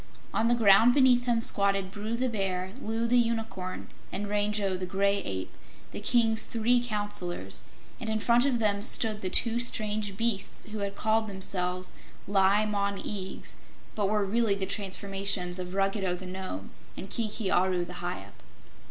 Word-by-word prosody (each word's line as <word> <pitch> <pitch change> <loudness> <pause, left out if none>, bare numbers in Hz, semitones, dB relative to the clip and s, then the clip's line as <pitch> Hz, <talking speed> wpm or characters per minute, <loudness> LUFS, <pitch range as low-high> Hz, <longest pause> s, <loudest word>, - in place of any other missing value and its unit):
On 225 - +1
the 240 - +4
ground 225 +2 +6
beneath 250 -3 +4
him 235 -1 +2
squatted 195 -3 +2
Bru 215 +3 -4
the 255 +1 0
Bear, 190 -5 -2
Loo 225 +2 -1
the 245 +1 +4
Unicorn, 225 -6 -2 0.2
and 205 +1 -3
Rango 205 -1 0
the 185 0 -4
Gray 200 +2 +1
Ape, 95 - -5 0.4
the - - -6
King's 225 0 +4
three 240 +2 +2
Counselors, 205 -6 -2 0.4
and 230 -3 -4
in 220 - 0
front 235 +2 +3
of 260 -3 +1
them 205 -3 +1
stood 215 -1 +1
the 185 - -2
two 230 +4 +2
strange 210 -4 -1
beasts 225 -3 -1
who 215 0 -5
had 200 0 -3
called 220 +1 +1
themselves 185 -2 +1 0.3
Li 200 +1 +3
Mon 200 -1 -1
Eags, 190 -2 -5 0.4
but 205 -2 0
were 210 -1 +1
really 220 0 +1
the 195 -1 -3
transformations 195 -2 -2
of 180 +1 -6
Ruggedo 195 -2 0
the 185 +1 -9
Nome, 180 - -6 0.3
and 190 - -6
Kiki 215 -1 -2
Aru 180 -1 +2
the 180 +1 -8
Hyup. 100 - -6
205 Hz, 165 wpm, -28 LUFS, 190-225 Hz, 0.4 s, ground